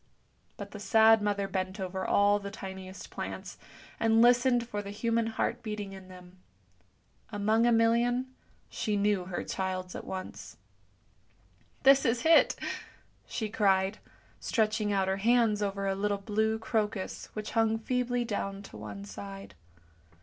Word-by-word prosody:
But 200 -1 -8
the 210 - -8
sad 220 +1 +5
mother 200 -1 0
bent 190 +1 -3
over 190 0 -3
all 205 0 +3
the 200 0 -6
tiniest 190 -1 -8
plants, - - -6 0.4
and 225 0 +3
listened 245 0 +4
for 205 -3 -3
the 200 - -8
human 230 +2 0
heart 225 +2 -2
beating 210 -3 -5
in 190 -1 -11
them. 180 0 -14 0.9
Among 220 +2 +2
a - - +4
million 235 +2 +3 0.4
she 210 -1 -2
knew 200 -2 +1
her 180 -1 -4
child's 185 -1 -3
at - - -6
once. 190 0 -7 0.6
" - - -35
This 275 0 +7
is 235 +2 0
it! 325 0 +6 0.4
" - - -25 0.3
she 220 - -3
cried, 195 -1 +2 0.4
stretching 215 -2 0
out 195 -1 +1
her 190 0 0
hands 225 0 +3
over 200 -1 -2
a 195 - +1
little 205 +1 0
blue 220 +2 0
crocus 220 -3 -2
which 215 0 -5
hung 225 -1 +2
feebly 245 +1 -1
down 200 -2 -3
to 105 - -11
one 105 -1 -8
side. 100 0 -9
205 Hz, 150 wpm, -30 LUFS, 190-225 Hz, 0.9 s, This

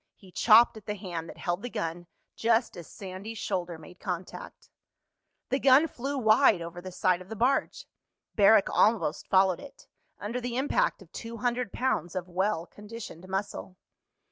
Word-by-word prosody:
He 190 -2 -17
chopped 230 +5 +6
at 210 - -14
the 210 - -2
hand 175 -5 -6
that - - -10
held 175 +2 -2
the 245 - -5
gun 175 -6 -4 0.3
just 230 +1 +1
as 170 - -9
Sandy's 195 +3 -8
shoulder 180 -5 -3
made 180 +3 -14
contact. 180 -2 -6 0.8
The 265 - +1
gun 275 +4 +6
flew 275 0 -4
wide 220 -3 +5
over 170 +1 -7
the 185 +1 -8
side 185 0 +1
of 185 - -13
the 220 - -5
barge. 255 +5 0 0.5
Barrack 205 0 +5
almost 210 -8 +1
followed 190 -1 +3
it, 280 - -13 0.3
under 230 +5 -4
the 245 0 -3
impact 290 - 0
of - - -24
two 230 0 -7
hundred 245 -2 -1
pounds 185 -9 -1
of 185 -1 -3
well 185 -1 -1
conditioned 210 -4 -10
muscle. 190 -1 -4
205 Hz, 170 wpm, -28 LUFS, 180-235 Hz, 0.8 s, chopped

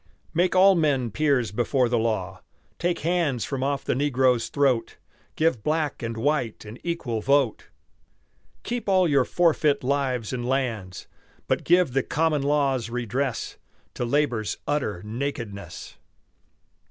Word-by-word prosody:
Make 180 +2 +2
all 195 +1 +7
men 140 - +1
peers 135 -6 +1
before 120 +4 +1
the 120 0 +1
law, 95 -5 -2 0.4
Take 175 0 -1
hands 160 - 0
from 135 -2 -4
off 140 +1 -1
the - - +1
negro's 130 -3 +2
throat, 130 -6 +1 0.4
Give 155 -8 +1
black 155 +1 -1
and 115 -1 -4
white 125 -4 -1
an 105 +3 -10
equal 145 -10 -2
vote. 135 -2 +1 1.0
Keep 240 -3 -3
all 185 -2 +4
your 140 -4 +3
forfeit 155 -4 +2
lives 130 -4 -1
and 125 -1 -3
lands, 115 -9 -2 0.4
But - - 0
give 175 -6 +3
the 135 - +2
common 155 +1 0
law's 135 -5 +1
redress 125 +2 -3 0.4
To - - -3
labor's 120 -4 0
utter 115 -11 -1
nakedness. 115 -3 -6
135 Hz, 135 wpm, -25 LUFS, 115-150 Hz, 1.0 s, all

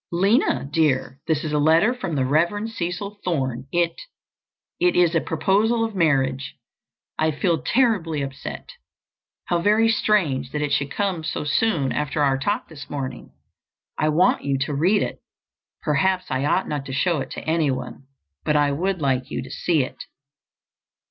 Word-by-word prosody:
"Lina, 195 - +2
dear, 135 -3 0
this 155 -2 +1
is 155 - -3
a 150 - +1
letter 165 +10 +4
from 190 -11 -4
the 130 -2 +1
Rev. 170 +10 +1
Cecil 200 0 -4
Thorne. 130 -7 -2
It—it 175 - -3
is—a 170 -2 +3
proposal 215 +8 +1
of 225 - -5
marriage. 135 -7 +1 0.6
I 155 - +3
feel 160 0 0
terribly 185 - +1
upset. 135 - -7 0.7
How 175 - +1
very 215 +4 +4
strange 165 - +1
that 150 - -1
it 145 - -2
should 140 0 +1
come 190 -4 -2
so 155 - -3
soon 150 - +1
after 150 0 -1
our 135 -1 +2
talk 205 +10 -1
this 145 -3 -11
morning! 135 -2 -5 0.6
I 155 - +1
want 160 +4 +3
you 140 -1 0
to 135 +2 -2
read 180 +9 +3
it! - - -5 0.6
Perhaps 185 +4 +1
I 130 +1 0
ought 185 +5 +1
not 145 -2 -3
to 135 - -5
show 165 +3 +1
it - - -5
to - - -8
anyone—but 135 - -3
I 145 -1 +3
would 180 +4 -1
like 130 -2 0
you - - -3
to 130 - -10
see 160 -6 +1
it." - - -8
155 Hz, 160 wpm, -23 LUFS, 140-185 Hz, 0.7 s, letter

